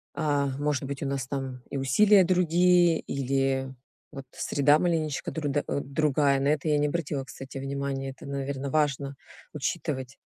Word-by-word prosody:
а, 145 -3 +1
может 145 -2 0
быть, 140 +1 -5
у - - -2
нас 135 -2 -2
там 130 -2 -4
и - - -4
усилия 190 - +5
другие 175 -1 +4
или, 135 0 -1 0.4
вот, 135 -1 -8
среда 145 +1 +2
маленечко 160 -5 -1
друда 145 -2 -1
э, - - -1
другая. 140 -1 +1
На 140 - 0
это 150 +1 0
я 150 - +3
не 150 0 +2
обратила, 145 -3 -2
кстати, 135 0 -9
внимание. 135 0 -3
Это, 130 - -13
наверно, 140 0 -3
важно 140 -2 0 0.4
учитывать. 140 -3 -3
140 Hz, 155 wpm, -27 LUFS, 135-155 Hz, 0.4 s, усилия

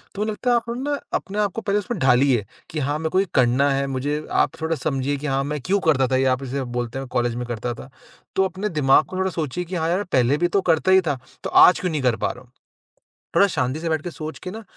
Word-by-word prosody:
तो 205 - -1
लगता 220 +3 -2
है 240 - +4
आप 235 0 -1
ना 285 +2 -2
अपने 205 +1 0
को 225 - -4
पहले 205 -1 +1
उसमें 210 -2 -4
ढालिए 125 -4 +3 0.2
कि 155 - -4
हाँ, 145 +1 -1
मेरे 160 0 -2
को 185 - +2
ये 195 - +2
करना 130 +2 +3
है, 135 0 0
मुझे 145 +3 -2
आप - - +2
थोड़ा 160 +1 0
समझिए 140 -1 -1
कि 150 - -5
हाँ, 135 0 0
मैं 150 -1 -3
क्यों 200 +7 +1
करता 135 -4 +4
था 130 - 0
ये 135 - +2
आप 135 - -10
जैसे 135 +1 -3
बोलते 120 +1 -4
हैं 135 - -6
कॉलेज 120 -1 -1
में 125 0 -4
करता 120 +1 -3
था। 125 - -11 0.5
तो 190 - +3
अपने 190 +3 -3
दिमाग 150 -3 +4
को 185 - -7
थोड़ा 190 0 0
सोचिए 165 +2 -3
कि 180 +2 -6
हाँ 165 -1 0
यार 185 +4 +1
पहले 135 -6 +2
भी 175 +2 +2
तो 195 +2 +1
करता 165 +4 +2
ही 190 0 +6
था, 145 -7 -2 0.2
तो - - -3
आज 180 - +7
क्यों 180 - -2
नहीं 155 -2 -1
कर 125 -3 +2
पा - - -1
रहा 125 - -12
हूँ? 125 - -26 0.9
थोड़ा 200 - +6
शांति 145 -4 -2
से 170 - -2
बैठ 160 -2 0
के 175 - -5
सोच 155 0 -7
के 180 - -5
ना 220 +4 -8
150 Hz, 270 wpm, -22 LUFS, 130-185 Hz, 0.9 s, आज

